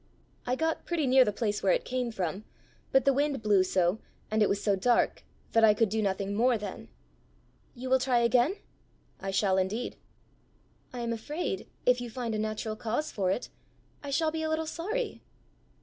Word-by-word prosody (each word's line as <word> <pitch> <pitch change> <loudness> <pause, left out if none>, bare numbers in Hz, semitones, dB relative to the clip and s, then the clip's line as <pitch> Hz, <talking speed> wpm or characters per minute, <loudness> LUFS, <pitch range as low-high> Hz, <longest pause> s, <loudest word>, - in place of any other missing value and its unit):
"I 250 - +1
got 320 +3 -1
pretty 335 -4 0
near 260 0 +6
the 210 - 0
place 210 -1 -2
it 190 - +2
came 250 -1 -1
from. 190 -1 -3 0.5
But 265 -1 +4
the 275 - +5
wind 280 -3 0
blew 205 -3 +4
so, 185 +2 +1 0.3
and 215 0 +1
it 210 - +4
was 200 - +1
so 200 -1 +2
dark, 240 +6 +1 0.3
that 225 - +4
I 210 -1 +7
could 225 -1 +2
do 220 +2 0
nothing 195 0 -1
more 240 +3 +3
then." 205 -3 -7 0.9
"You 255 +1 -6
will 260 0 +4
try 250 -1 +2
again?" 245 +8 +3 0.6
"I 195 - -4
shall 190 -1 +2
indeed." 205 +6 -2 0.9
"I 245 - -5
am 235 0 -1
afraid, 230 - -4 0.2
if 250 0 +4
you 240 - -5
find 235 -1 -4
a 215 - -1
natural 215 0 -3
cause 235 +8 -2
for 190 -3 0
it, 195 +6 -2 0.5
I 285 - -7
shall 310 +3 +1
be 320 0 -3
a 315 - -1
little 315 0 0
sorry." 420 +10 -3
235 Hz, 190 wpm, -29 LUFS, 205-265 Hz, 0.9 s, I